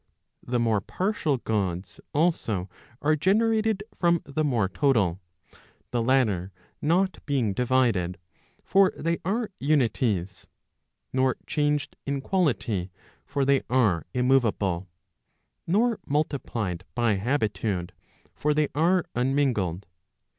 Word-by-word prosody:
The 125 0 -1
more 110 -3 +2
partial 180 - -1
Gods 100 -6 -2
also 140 - 0 0.4
are 155 +1 +4
generated 215 +4 +2
from 170 -1 +2
the 145 +2 -2
more 120 -9 +1
total; 100 - +1 0.7
the 120 - 0
latter 110 -7 +2 0.3
not 180 +5 +1
being 130 -8 +1
divided, 120 -7 +1 0.5
for 195 -1 +4
they 165 +1 -1
are 215 +4 -1
unities; 115 - 0 0.7
nor 130 -1 +2
changed 150 -1 -1
in 140 0 -1
quality, 130 - 0 0.4
for 140 -2 0
they 140 0 +3
are 110 -10 +2
immoveable; 115 -8 +1 0.8
nor 220 +5 +2
multiplied 120 - -2
by 115 -4 +2
habitude, 105 -6 -1 0.4
for 150 0 0
they 150 -1 +2
are 175 +4 +2
unmingled. 125 - 0
130 Hz, 105 wpm, -26 LUFS, 105-155 Hz, 0.8 s, are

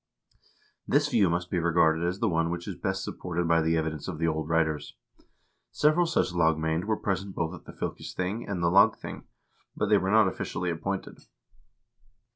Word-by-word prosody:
This 145 +1 +2
view 110 - +3
must 85 +1 -2
be 90 - +1
regarded 80 -1 +3
as 90 +2 -2
the 115 - 0
one 80 -3 +1
which 85 0 -4
is 100 - -3
best 95 +2 -2
supported 90 -1 -3
by 80 0 +4
the 80 +1 +1
evidence 80 -1 -3
of 90 -5 -4
the 80 - 0
old 80 -1 -2
writers. 80 -4 0 0.8
Several 155 +3 +3
such 155 - 0
lagmand 80 0 +1
were 110 0 0
present 95 -1 -3
both 80 -1 -2
at - - -11
the - - -9
fylkesthing 95 +6 -4
and 90 -4 -2
the 85 - +3
lagthing, 100 +2 +2 0.5
but - - -1
they - - +5
were 95 - -1
not 110 -1 +5
officially 90 -1 -3
appointed. 95 +4 -4
85 Hz, 180 wpm, -28 LUFS, 80-100 Hz, 0.8 s, they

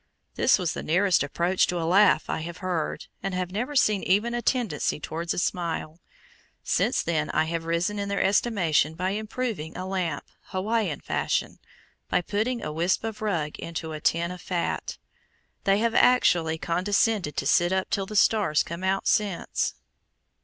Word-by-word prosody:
This - - +4
was 180 -4 -1
the - - -5
nearest 185 +2 +2
approach 170 +6 +1
to 180 - -2
a 165 - -1
laugh 195 +4 +4
I - - -2
have 170 +2 -6
heard, 180 -4 -3 0.2
and 195 -1 -3
have 180 -1 -2
never 245 +9 -3
seen 215 -7 +3
even 210 +6 +1
a 240 - -1
tendency 225 - 0
towards 165 +3 -4
a - - -2
smile. 170 -2 -2 0.6
Since - - +1
then 155 -3 -1
I 155 - +2
have 165 +1 -3
risen 170 +5 0
in 200 0 -3
their 200 - -1
estimation 190 -7 +2
by 185 +3 -1
improvizing 215 -6 -4
a 185 - -4
lamp 185 -3 -2 0.2
Hawaiian 200 - -1
fashion - - -1 0.5
by 180 - +2
putting 220 +7 -2
a 150 - -4
wisp 170 +6 +1
of 220 -1 -5
rag 170 -8 -2
into 160 -1 -5
a 155 - -6
tin 170 +3 +1
of 180 - -8
fat. 175 -2 -3 0.7
They 195 0 +4
have 230 +1 +1
actually 170 -12 +4
condescended 185 +1 0
to - - -1
sit 175 +5 +3
up 190 0 -1
till 195 -2 0
the 215 - -7
stars 205 -7 +3
come 170 +2 -7
out 190 +1 0
since. 205 -4 0
185 Hz, 175 wpm, -26 LUFS, 165-205 Hz, 0.7 s, This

